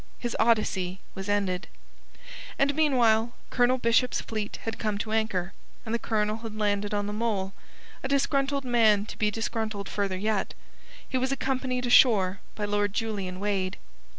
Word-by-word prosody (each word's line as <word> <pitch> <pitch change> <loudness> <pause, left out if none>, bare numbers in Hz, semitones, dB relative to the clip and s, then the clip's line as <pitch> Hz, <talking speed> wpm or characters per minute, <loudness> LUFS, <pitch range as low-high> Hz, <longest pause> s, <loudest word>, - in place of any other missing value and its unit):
His 240 -1 -3
odyssey 195 -5 +2
was 195 +1 -6
ended. 195 -3 0 0.9
And 280 +1 +3
meanwhile 240 -6 +3 0.2
Colonel 245 +1 +3
Bishop's 240 +1 +2
fleet 215 -2 -4
had 225 - -4
come 215 -2 -1
to 215 +1 -4
anchor, 205 -4 0 0.3
and 220 - -3
the 235 - +1
Colonel 215 -1 0
had 225 -2 -7
landed 205 -1 0
on 205 -1 0
the 205 - -3
mole, 210 -4 -1 0.5
a - - -3
disgruntled 275 0 +1
man 220 -4 +4
to - - -9
be 210 - +3
disgruntled 220 -2 -3
further 195 -2 -2
yet. 210 +1 -1 0.5
He 260 - -1
was 260 +1 0
accompanied 260 -2 -1
ashore 205 -6 +5 0.2
by 210 - -2
Lord 205 -1 0
Julian 200 -5 -3
Wade. 195 -2 -1
220 Hz, 155 wpm, -27 LUFS, 205-240 Hz, 0.9 s, ashore